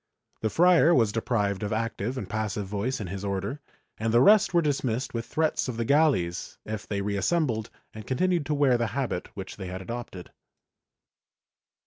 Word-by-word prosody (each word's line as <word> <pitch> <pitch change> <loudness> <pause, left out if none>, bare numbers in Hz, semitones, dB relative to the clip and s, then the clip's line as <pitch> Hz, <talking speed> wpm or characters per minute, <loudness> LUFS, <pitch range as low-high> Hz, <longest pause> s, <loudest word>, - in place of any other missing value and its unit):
The 110 - +1
friar 170 +2 +5
was 115 -4 +3
deprived 105 -3 -1
of 105 - -3
active 115 +2 -2
and 105 - -4
passive 105 0 -2
voice 105 +7 -2
in 105 - -4
his 95 +2 -6
Order 100 +9 -3 0.4
and 110 0 0
the 120 - +5
rest 205 - +6
were 175 -1 +4
dismissed 135 -4 -1
with 115 -1 -4
threats 155 -3 0
of 125 -3 -4
the 115 - -1
galleys 135 - +1
if 110 -1 -5
they 100 -1 -2
reassembled 110 - 0 0.2
and 110 -1 -10
continued 170 +4 +1
to 150 - 0
wear 135 -4 +3
the 120 - +1
habit 125 -10 -2
which 95 -1 -7
they 95 -2 -6
had 90 +1 -5
adopted. 95 -3 -7
115 Hz, 175 wpm, -27 LUFS, 100-140 Hz, 0.4 s, rest